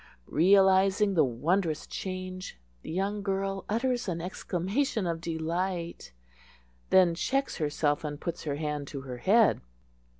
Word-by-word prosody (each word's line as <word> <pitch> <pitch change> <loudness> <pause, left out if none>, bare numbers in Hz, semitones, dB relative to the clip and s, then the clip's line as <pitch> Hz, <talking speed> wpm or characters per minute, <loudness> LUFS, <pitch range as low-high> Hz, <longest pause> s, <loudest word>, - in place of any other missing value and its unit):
Realizing 195 +3 +5
the 165 - +4
wondrous 155 +6 0
change, 185 - -6 0.2
the - - -9
young 195 +4 -1
girl 195 -1 -2
utters 245 +2 0
an 170 -3 -2
exclamation 190 +6 -2
of 165 -1 -2
delight; 170 - -3 0.8
then 185 -2 +5
checks 270 +10 -1
herself, 145 -1 0
and 145 -1 -4
puts 170 0 -5
her 145 -2 -1
hand 150 -1 -3
to 140 -1 -6
her 130 -2 -7
head. 210 - +4
180 Hz, 130 wpm, -29 LUFS, 160-195 Hz, 0.8 s, Realizing